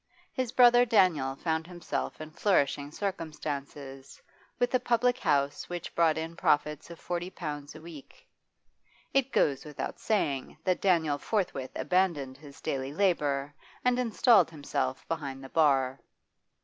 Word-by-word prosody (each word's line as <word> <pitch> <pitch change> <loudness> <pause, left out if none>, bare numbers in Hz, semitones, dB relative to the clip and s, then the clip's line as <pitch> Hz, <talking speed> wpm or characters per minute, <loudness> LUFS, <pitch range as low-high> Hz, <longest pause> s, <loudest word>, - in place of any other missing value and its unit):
His 255 -3 -2
brother 245 -1 +7
Daniel 180 - +3
found 160 +2 -2
himself 175 -1 -4
in 155 0 -8
flourishing 145 -6 +1
circumstances, 145 -6 -5 0.4
with 245 - 0
a 255 - +4
public 245 0 +1
house 145 0 0
which 175 -1 -5
brought 165 -2 +3
in 165 +1 -4
profits 150 -1 +1
of 170 - -10
forty 175 0 -3
pounds 150 -5 -6
a 155 - -10
week 160 -4 -13 0.9
It 270 -1 +2
goes 140 -2 +2
without 150 -2 -6
saying 145 -11 -1
that 185 -1 0
Daniel 160 -6 +2
forthwith 175 - -2
abandoned 165 -8 0
his 145 -1 -14
daily 135 0 -3
labour 145 -5 0 0.3
and 250 0 +3
installed 235 -3 +4
himself 140 -4 -3
behind 140 -5 -4
the 135 - -9
bar. 135 -4 +2
155 Hz, 135 wpm, -29 LUFS, 140-185 Hz, 0.9 s, brother